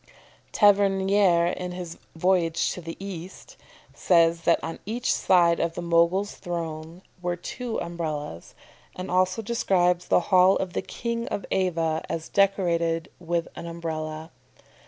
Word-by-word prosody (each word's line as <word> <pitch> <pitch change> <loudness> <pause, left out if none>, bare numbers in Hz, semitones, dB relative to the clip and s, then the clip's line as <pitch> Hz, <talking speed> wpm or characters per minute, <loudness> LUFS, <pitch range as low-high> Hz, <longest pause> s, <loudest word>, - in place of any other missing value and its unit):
Tavernier, 195 -3 +4
in 180 0 -5
his 180 -2 -7 0.2
"Voyage 170 -1 +1
to 180 - -6
the 165 0 -7
East," 190 -2 -8 0.4
says 165 -1 +3
that - - +4
on 165 - -5
each 235 +4 -1
side 170 -2 +3
of 170 0 -1
the - - -4
Mogul's 170 +4 +2
throne 165 0 -6 0.2
were 175 0 -1
two 235 +6 -5
Umbrellas, 155 - -5 0.4
and 185 - -6
also 185 +4 +1
describes 180 -5 +1
the - - +4
hall 185 +1 +6
of 185 -2 -3
the - - -1
King 235 0 -4
of 200 - -4
Ava 165 -4 0
as 165 -1 -4
decorated 170 -4 +1
with 170 -1 -2
an 170 - -7
Umbrella. 160 -1 -5
175 Hz, 135 wpm, -25 LUFS, 165-190 Hz, 0.4 s, hall